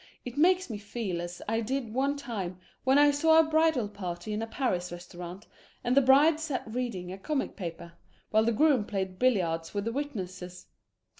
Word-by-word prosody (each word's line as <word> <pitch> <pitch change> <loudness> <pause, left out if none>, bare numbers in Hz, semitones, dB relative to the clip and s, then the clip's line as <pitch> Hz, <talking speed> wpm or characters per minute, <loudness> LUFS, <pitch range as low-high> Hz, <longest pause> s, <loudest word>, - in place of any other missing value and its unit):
It 245 0 -6
makes 365 +5 +4
me 215 -4 -5
feel 205 -4 -4
as 175 +1 -7
I 225 +1 +1
did 240 -1 -3
one 275 +3 +1
time 205 -10 -5 0.3
when 265 +1 +4
I 290 0 +6
saw 320 +3 +4
a 325 - +8
bridal 315 -6 +2
party 200 0 -5
in 210 - -2
a 225 - -3
Paris 185 -8 -1
restaurant, 175 +3 -8 0.4
and 245 +1 +1
the 275 - +7
bride 285 +4 +5
sat 305 -5 -2
reading 220 -6 -4
a 190 - -7
comic 295 +6 -2
paper, 170 -2 -7 0.4
while 220 +1 +4
the 230 - +3
groom 270 0 +3
played 190 -3 -4
billiards 175 -9 +1
with 200 0 -1
the 230 - -1
witnesses. 185 -10 -5
225 Hz, 190 wpm, -29 LUFS, 185-275 Hz, 0.4 s, a